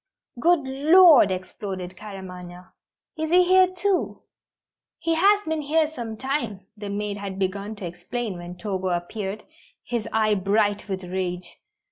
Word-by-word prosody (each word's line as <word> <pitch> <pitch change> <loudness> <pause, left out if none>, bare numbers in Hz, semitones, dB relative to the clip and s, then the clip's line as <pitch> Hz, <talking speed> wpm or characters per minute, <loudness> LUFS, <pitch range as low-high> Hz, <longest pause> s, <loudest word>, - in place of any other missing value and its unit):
"Good 340 +4 +4
Lord!" 290 - +6
exploded 185 0 -5
Claremanagh. 180 -3 -10 0.5
"Is 315 0 -1
he 360 +2 +6
here, 370 +1 +5
too?" 370 +1 -1 0.7
"He 330 - 0
has 405 +5 +4
been 315 -3 -2
here 310 +2 +2
some 235 -8 -6
time," 235 -6 -2
the 205 -1 -7
maid 205 0 -3
had 200 -2 -6
begun 200 +2 -2
to 200 - -7
explain 180 +5 -5
when 175 +1 -9
Togo 190 0 -3
appeared, 190 +4 -3 0.4
his 235 -3 -3
eye 215 -1 +2
bright 205 +1 +1
with 190 -1 -3
rage. 180 0 -4
210 Hz, 140 wpm, -24 LUFS, 185-295 Hz, 0.7 s, Lord